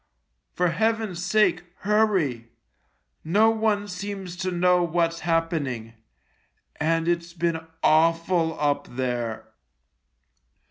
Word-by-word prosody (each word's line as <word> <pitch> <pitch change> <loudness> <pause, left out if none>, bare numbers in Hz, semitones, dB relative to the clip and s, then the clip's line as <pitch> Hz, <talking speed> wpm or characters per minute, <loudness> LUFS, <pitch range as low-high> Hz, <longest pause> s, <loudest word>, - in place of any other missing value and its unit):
For 180 0 +2
Heaven's 215 -1 -1
sake, 195 -1 +2 0.2
hurry. 190 - +1 0.8
No 210 +8 +4
one 215 -2 0
seems 195 -1 -6
to 185 +1 -2
know 180 0 +3
what's 170 0 0
happening 155 -9 -1 0.4
— - - -44
and 165 +2 0
it's 170 0 -1
been 170 -1 -1 0.2
awful 165 +1 +2
up 145 -1 0
there." 120 -3 -3
170 Hz, 100 wpm, -25 LUFS, 160-195 Hz, 0.8 s, No